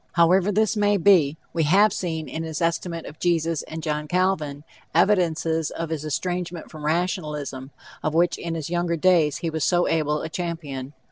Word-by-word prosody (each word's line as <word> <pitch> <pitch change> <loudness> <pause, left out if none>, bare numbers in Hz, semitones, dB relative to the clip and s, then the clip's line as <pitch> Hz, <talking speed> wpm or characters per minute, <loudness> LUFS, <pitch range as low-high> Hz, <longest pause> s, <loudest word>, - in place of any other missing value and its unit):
However 180 +4 +4
this 215 +1 +2
may 205 -1 +3
be, 165 -6 +4 0.2
we 165 - 0
have 195 +7 +4
seen, 160 -3 -3
in 160 - -5
his 160 -2 -4
estimate 170 0 -1
of 150 - -10
Jesus 165 -2 +1
and 160 0 -8
John 150 -1 -2
Calvin, 155 -5 0 0.3
evidences 165 -5 +2
of 165 -1 -5
his 155 -2 -3
estrangement 175 +2 -3
from 155 -2 -8
rationalism, 150 -6 -2 0.3
of 155 0 -2
which 175 +1 +2
in 170 -1 -4
his 160 0 -5
younger 175 -1 0
days 160 -4 +3
he 165 - -1
was 160 -1 -2
so 175 0 +2
able 150 -2 0
a - - -3
champion. 150 -6 -5
165 Hz, 180 wpm, -24 LUFS, 155-180 Hz, 0.3 s, However